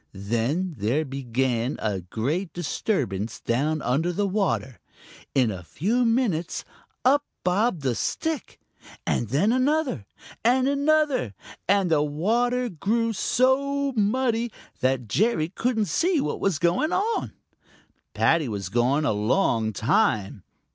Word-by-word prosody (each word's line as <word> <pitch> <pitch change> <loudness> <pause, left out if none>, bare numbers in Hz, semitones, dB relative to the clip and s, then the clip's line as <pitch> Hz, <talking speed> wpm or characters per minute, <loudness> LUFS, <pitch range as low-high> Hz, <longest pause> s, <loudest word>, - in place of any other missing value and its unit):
Then 120 - -1
there 125 +10 +1
began 130 -1 -1
a 105 -3 -2
great 140 - -2
disturbance 115 - -2
down 150 +6 0
under 145 +9 +1
water. 190 - -1 0.6
In 125 -5 +3
a 95 -2 -6
few 215 - 0
minutes 225 -9 0 0.4
up 285 +3 +5 0.2
bobbed 180 - +1
a 130 - +2
stick, 320 - -3 0.5
and 120 - 0
then 150 - +2
another 260 - +1 0.4
and 255 +3 +3
another, 285 - +1 0.3
and 195 -3 +3
the 155 -2 +4
water 235 +12 +1
grew 225 +4 0
so 275 +5 +1
muddy 230 +2 +1 0.3
that 130 -2 0
Jerry 165 - +1
couldn't 225 +3 0
see 345 - +1
what - - -2
was 195 -6 +1
going 175 - +1
on. 445 +4 0 0.8
Paddy 160 -5 +2
was 100 -4 -4
gone 125 +7 +2
a - - +2
long 110 - +1
time. 110 - +1
175 Hz, 120 wpm, -25 LUFS, -, 0.8 s, up